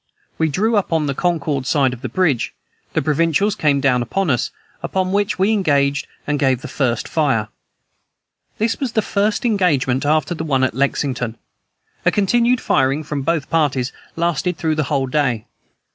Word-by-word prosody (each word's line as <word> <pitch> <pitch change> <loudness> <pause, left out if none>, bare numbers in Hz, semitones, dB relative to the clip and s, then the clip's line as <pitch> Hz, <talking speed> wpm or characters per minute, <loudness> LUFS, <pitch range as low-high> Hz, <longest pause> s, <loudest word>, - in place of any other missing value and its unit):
We 160 -1 +2
drew 215 +9 +1
up 200 - 0
on 160 -2 +2
the 140 - -1
Concord 150 -5 -1
side 135 -4 +2
of 125 - -9
the 130 - -4
bridge; 145 -2 0 0.4
the - - 0
provincials 165 +7 +2
came 145 -4 +2
down 130 -3 +2
upon 175 +8 0
us, 120 - 0 0.3
upon 185 -1 -1
which 205 +2 0
we 195 +3 +2
engaged 145 -8 +1 0.2
and 145 0 -1
gave 130 -3 +2
the - - -5
first 120 -5 -1
fire. 135 -9 +1 1.1
This 225 +1 0
was 260 -4 -2
the 220 - +2
first 205 +4 0
engagement 150 - +2
after 155 +2 +1
the 160 - -4
one 135 -4 +1
at 130 - +1
Lexington. 130 -3 -1 0.7
A - - +4
continued 240 +5 +2
firing 135 - +1
from 150 -1 -3
both 155 0 -1
parties 140 -5 +1 0.2
lasted 170 +1 0
through 160 -1 0
the 155 -1 0
whole 140 -3 +1
day. 130 -5 0
150 Hz, 175 wpm, -19 LUFS, 135-185 Hz, 1.1 s, A